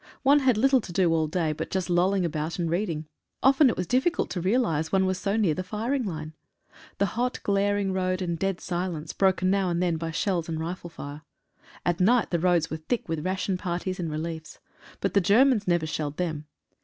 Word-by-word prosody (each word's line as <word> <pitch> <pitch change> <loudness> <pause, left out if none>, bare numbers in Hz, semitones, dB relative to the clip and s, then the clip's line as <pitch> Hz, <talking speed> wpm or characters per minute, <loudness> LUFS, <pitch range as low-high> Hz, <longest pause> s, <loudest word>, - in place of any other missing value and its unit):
One 280 +2 +6
had 260 -5 +3
little 265 +2 +4
to 190 - -9
do 175 -2 +2
all 160 -1 +1
day. 160 0 0
but - - -5
just 190 -2 -2
lolling 180 +1 +2
about 155 0 -3
and 175 -2 -1
reading. 170 -4 -1 0.4
Often 270 +1 +6
it - - -2
was 180 - -1
diffi 260 - +2
cult - - -3
to 180 - -2
realise 175 -6 +1
one 190 -1 +3
was 185 0 -1
so 200 +1 -1
near 200 -8 +2
the 185 - -3
firing 230 +7 -2
line. 155 -4 -5 0.6
The 200 - +2
hot 240 +6 -2
glaring 200 -1 +1
road 185 -1 0
and 170 -3 -2
dead 195 -1 -1
silence, 175 -3 -3
broken 190 -1 +2
now 195 -2 +1
and 170 0 0
then 175 -2 +1
by 165 0 -4
shells 170 0 -1
and 160 -1 -2
rifle 175 +2 -5
fire. 145 -2 -8 0.6
At 175 -1 +1
night 225 +5 +3
the 170 - +1
roads 170 -2 +2
were 160 - -2
thick 220 +10 -3
with 160 -2 -3
ration 185 0 -1
parties 185 0 -3
and 170 -2 -2
reliefs. 160 +1 -5 0.4
But - - 0
the 200 - +4
Germans 215 +3 +4
never 175 -2 +2
shelled 150 -2 -3
them. 155 -4 -3
180 Hz, 215 wpm, -26 LUFS, 165-200 Hz, 0.6 s, One